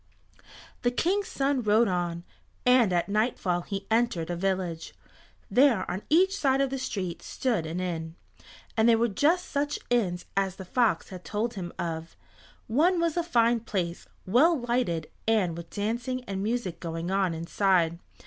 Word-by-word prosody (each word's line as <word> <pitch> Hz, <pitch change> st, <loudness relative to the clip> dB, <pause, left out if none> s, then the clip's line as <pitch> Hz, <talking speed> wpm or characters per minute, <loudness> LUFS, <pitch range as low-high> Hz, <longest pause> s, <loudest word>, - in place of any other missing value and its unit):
The 245 Hz, -, +2 dB
King's 370 Hz, +11 st, 0 dB
son 275 Hz, -1 st, 0 dB
rode 220 Hz, +1 st, +4 dB
on, 175 Hz, -2 st, -2 dB, 0.4 s
and 250 Hz, -5 st, +5 dB
at 175 Hz, -1 st, +1 dB
nightfall 200 Hz, -4 st, 0 dB
he 195 Hz, +2 st, -5 dB
entered 220 Hz, -8 st, +1 dB
a -, -, -1 dB
village. 180 Hz, -2 st, -2 dB, 0.6 s
There 250 Hz, -7 st, +4 dB
on 185 Hz, +3 st, -3 dB
each 375 Hz, +5 st, +4 dB
side 270 Hz, -6 st, +2 dB
of 275 Hz, -1 st, +1 dB
the 270 Hz, -, -2 dB
street 185 Hz, -8 st, -4 dB
stood 225 Hz, -11 st, -1 dB
an 165 Hz, +3 st, -3 dB
inn, 165 Hz, -3 st, -4 dB, 0.6 s
and 225 Hz, +1 st, +4 dB
they 230 Hz, -, +6 dB
were 230 Hz, +1 st, +2 dB
just 310 Hz, -, +1 dB
such 290 Hz, +1 st, -1 dB
inns 180 Hz, -7 st, +1 dB
as 195 Hz, -2 st, 0 dB
the 190 Hz, -, -9 dB
fox 215 Hz, -4 st, +1 dB
had 185 Hz, -2 st, -9 dB
told 225 Hz, +3 st, -2 dB
him 180 Hz, -5 st, -5 dB
of. 165 Hz, -1 st, -4 dB, 0.5 s
One 335 Hz, +10 st, +3 dB
was 335 Hz, -2 st, +1 dB
a 345 Hz, -, +2 dB
fine 235 Hz, -8 st, +2 dB
place, 185 Hz, -6 st, -3 dB, 0.2 s
well 295 Hz, -, +4 dB
lighted, 235 Hz, -10 st, 0 dB, 0.2 s
and 205 Hz, -7 st, +2 dB
with 170 Hz, 0 st, -8 dB
dancing 240 Hz, +5 st, -2 dB
and 195 Hz, -5 st, -4 dB
music 210 Hz, -5 st, -2 dB
going 165 Hz, +1 st, -4 dB
on 190 Hz, -3 st, +1 dB
inside. 170 Hz, 0 st, +1 dB
210 Hz, 165 wpm, -27 LUFS, 175-250 Hz, 0.6 s, they